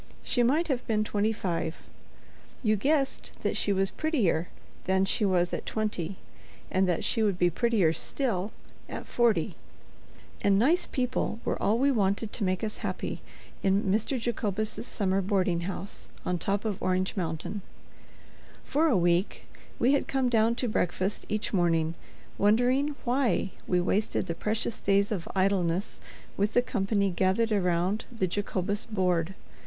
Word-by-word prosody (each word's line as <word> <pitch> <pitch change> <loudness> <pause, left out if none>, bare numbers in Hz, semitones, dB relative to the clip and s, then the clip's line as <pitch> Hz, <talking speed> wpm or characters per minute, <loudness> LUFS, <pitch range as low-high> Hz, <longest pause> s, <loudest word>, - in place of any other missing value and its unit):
She 245 - +1
might 290 +8 +3
have 265 -5 -1
been 215 -2 +2
twenty 210 +1 0
five; 170 -6 -2 0.9
you 215 -2 +3
guessed 275 +5 0
that - - 0
she 205 - +1
was 195 0 +2
prettier 210 - +1 0.4
than 190 +1 +3
she 210 - +1
was 180 -2 +2
at - - -4
twenty, 200 -5 -2 0.6
and 185 0 +2
that 175 - 0
she 225 - +1
would 205 -4 +2
be 175 -1 +3
prettier 205 -5 +2
still 215 -3 -2 0.4
at - - -6
forty. 235 -2 +2 0.9
And 200 -1 +4
nice 305 - +3
people 250 -3 -1
were - - -1
all 215 +3 +3
we 275 +3 +3
wanted 205 -2 0
to 225 - -2
make 185 0 0
us 215 -1 -3
happy - - -4 0.4
in 195 +1 +2
Mr. 215 +7 +1
Jacobus's 215 -1 -2
summer 195 -2 0
boarding 185 -3 +1
house 195 +1 -6 0.2
on 180 -1 0
top 200 +2 -1
of 210 -4 -2
Orange 185 0 0
Mountain. 170 +2 -3 1.0
For 310 +4 +2
a 255 -10 +3
week 175 +2 +1 0.3
we 255 +4 +3
had 280 - +1
come 265 -2 +1
down 230 0 +3
to 250 - -1
breakfast 190 -1 -1
each 215 +1 -2
morning, 165 -3 +2 0.5
wondering 250 +8 +3
why 245 -5 +1 0.2
we 180 - +2
wasted 190 +3 0
the 170 - -2
precious 215 +5 -2
days 200 +1 +2
of 185 -6 -2
idleness 185 -1 +1 0.4
with 205 +2 +1
the 245 - +4
company 200 -4 0
gathered 190 +6 +1
around 185 +1 +1
the 225 -6 0
Jacobus 200 +2 -2
board. 185 -4 0
200 Hz, 155 wpm, -28 LUFS, 185-230 Hz, 1.0 s, And